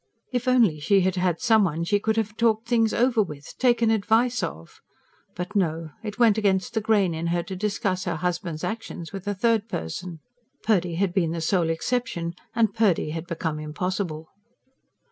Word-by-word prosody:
If 245 0 -1
only 230 -12 +4
she 195 +6 +3
had 185 0 +1
had 180 -2 0
some 220 -3 +4
one 165 -2 -1
she 205 +4 +2
could 220 +2 0
have 215 -1 -1
talked 225 -1 +1
things 225 -2 +3
over 240 -2 +3
with, 150 -7 -6
taken 240 -3 +3
advice 225 +3 +2
of! 80 +1 -6 0.5
But 180 +4 -5
no 165 -4 0
it 210 -2 -6
went 225 -3 +4
against 190 -3 +1
the 220 - 0
grain 205 -5 +2
in 165 +1 -3
her 170 0 0
to 190 - -6
discuss 190 -2 -1
her 175 -3 -1
husband's 175 -2 -3
actions 220 -6 -5
with 195 0 -7
a 205 - -1
third 225 +1 +1
person. 160 - -5 0.4
Purdy 180 -6 +1
had 185 0 0
been 170 -4 +1
the 170 - -3
sole 165 0 +1
exception, 170 -1 -2 0.2
and 220 -3 +2
Purdy 200 -8 +2
had 165 +2 -5
become 160 -3 -3
impossible. 160 +1 -3
190 Hz, 185 wpm, -25 LUFS, 170-220 Hz, 0.5 s, only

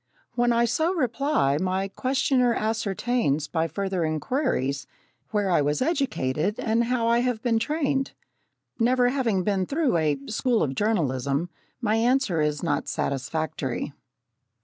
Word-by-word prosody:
When 240 0 +2
I 235 0 +3
so 320 +10 +1
reply, 255 - +1
my 190 +1 0
questioner 255 +2 +1
ascertains 215 - 0
by 160 0 0
further 190 +2 -2
inquiries 155 - -1 0.4
where 205 -3 0
I 170 - +4
was 145 +1 0
educated 210 - 0
and 230 +1 +1
how 235 -1 0
I 235 +1 +4
have 245 -2 -1
been 230 -3 +2
trained. 275 +1 -1 0.7
Never 245 +1 +3
having 235 -8 0
been 190 -2 0
through 285 - +1
a 155 -3 +1
"School 230 - +1
of 135 -3 -1
Journalism," 145 - 0 0.3
my 220 -1 +1
answer 230 - +2
is 150 0 -1
not 145 -4 -1
satisfactory. 140 -1 -2
215 Hz, 135 wpm, -25 LUFS, 155-250 Hz, 0.7 s, I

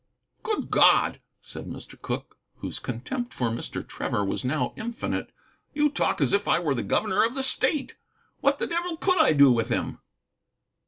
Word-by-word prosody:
"Good 430 -2 -2
God," - - +5 0.2
said - - -9
Mr. - - -9
Cooke, - - -5 0.2
whose - - -6
contempt 250 -3 -5
for 125 -2 0
Mr. 115 - -5
Trevor 100 - -2
was 95 - -2
now 140 +4 -1
infinite, 235 +1 -4 0.4
"you 295 0 +3
talk 285 - 0
as - - +2
if 200 0 +1
I - - +4
were 165 -5 0
the 120 - -1
governor 210 -2 +1
of 230 +3 0
the 270 - -1
state. 265 +2 0 0.4
What 280 0 +2
the - - -1
devil 340 0 -2
could 370 +1 +2
I 315 - +6
do 140 -2 +7
with 115 0 +1
him?" 120 - -2
235 Hz, 175 wpm, -26 LUFS, -, 0.4 s, do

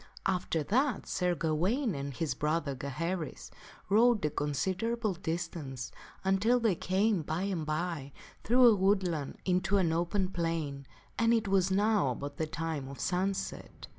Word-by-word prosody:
After 175 -4 0
that 255 - +1
Sir 180 -1 0
Gawaine 185 - 0
and 140 -1 -4
his 140 +1 -2
brother, 150 +2 -1
Gaheris, 155 +5 -4 0.4
rode 220 0 +4
a 150 - 0
considerable 190 - -1
distance 160 -7 -4 0.3
until 200 +6 +3
they 225 -4 +3
came, 190 +2 +1
by 160 +4 -2
and 180 -6 -2
by, 155 -3 -2 0.3
through 250 +2 +5
a 230 -3 +8
woodland 185 -7 +1
into 185 +2 +2
an 170 -4 +2
open 175 +3 0
plain, 165 -6 -2 0.3
and 230 0 +4
it 220 -2 0
was 190 -1 +3
now 205 -5 +3
about 140 +3 -5
the 160 - -1
time 160 -3 -3
of 135 -2 -9
sunset. 185 +6 -2
180 Hz, 145 wpm, -31 LUFS, 155-200 Hz, 0.4 s, a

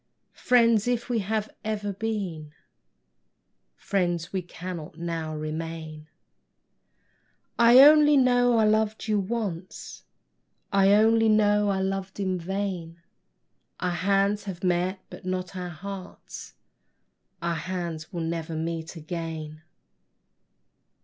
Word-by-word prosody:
Friends, 230 -3 +3
if 245 -1 -1
we 240 -2 +1
have 215 +1 -1 0.2
ever 205 -2 -3
been, 185 -8 -4 1.2
Friends 175 -4 -2
we 190 - 0
cannot 175 -3 -8
now 165 -2 -4
remain: 155 0 -6 1.5
I 235 +2 +8
only 295 0 +7
know 245 -2 +4
I 220 - +4
loved 215 0 +1
you 210 -1 +2
once, 195 -4 -5 0.7
I 195 0 +5
only 225 +1 +4
know 210 -1 +3
I 190 -1 0
loved 195 0 -3
in 185 -2 -1
vain; 180 -2 -4 0.8
Our 180 - -1
hands 200 +3 +1
have 185 -2 -7
met, 180 +1 0
but - - -10
not 185 0 -4
our 180 -1 -4
hearts; 190 +3 -9 0.8
Our 170 0 -1
hands 170 -1 -5
will 175 - -4
never 165 0 -3
meet 165 +1 -4
again! 160 -1 -6
185 Hz, 110 wpm, -26 LUFS, 165-215 Hz, 1.5 s, I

